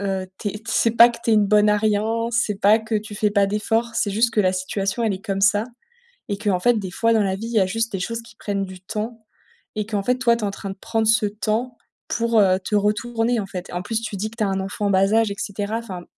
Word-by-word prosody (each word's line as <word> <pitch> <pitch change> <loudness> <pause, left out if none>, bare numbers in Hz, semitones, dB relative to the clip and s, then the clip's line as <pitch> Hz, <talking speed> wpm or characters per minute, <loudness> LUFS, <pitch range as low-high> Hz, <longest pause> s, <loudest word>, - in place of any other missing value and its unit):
heu, 190 -2 -2
tu 210 - -3
es - - -4
t - - -23
c'est 230 0 +2
pas 235 +1 +7
que 235 - -7
tu 230 - +1
es - - +5
une 210 -1 +4
bonne 210 0 +4
à 210 - +3
rien, 220 +2 0
c'est 220 -4 0
pas 210 +3 +5
que 220 0 -5
tu 210 0 -3
fais 210 0 +1
pas 200 -1 +3
d'efforts. 225 +3 -1
C'est 205 - 0
juste 230 +3 +2
que 215 - +4
la 185 -2 +2
situation, 195 +4 -2
elle 220 -3 +1
est 190 - -10
comme 195 -1 -2
ça 205 +2 +3 0.7
et 200 - -2
qu'en 205 -4 0
fait, 240 +2 +3
des 190 -3 -5
fois 230 +5 +1
dans 220 -2 +3
la 190 -1 -1
vie, 225 +3 -6
il - - -6
y 220 - +3
a 190 - +3
juste 225 +3 -1
des 195 - -3
choses 230 +5 -3
qui 230 -1 -16
prennent 200 -1 -2
du 185 -1 -10
temps 220 +3 -5 0.5
et 210 - -1
qu'en 210 -2 -2
fait, 250 +5 +1
toi, 235 -3 +3
tu 230 - -8
es - - +1
en - - -1
train 195 0 -7
de 195 - -7
prendre 225 -1 -1
ce 220 -1 +4
temps 220 +4 -2 0.3
pour, 230 -1 +2
heu, 185 -2 +4
te 195 +2 -5
retourner 225 +3 +1
en 195 - -5
fait 180 -2 -7
et - - -11
en 175 - -2
plus, 225 +3 -2
tu 215 -3 -5
dis 215 +3 -3
que 230 - -16
tu 215 - +1
as - - 0
un 195 0 -1
enfant 200 +2 -3
en - - +1
bas 195 +1 +3
âge 225 -2 +3
et 200 - -5
cetera. 205 +1 -3
Enfin 185 -7 -8
210 Hz, 300 wpm, -22 LUFS, 195-225 Hz, 0.7 s, pas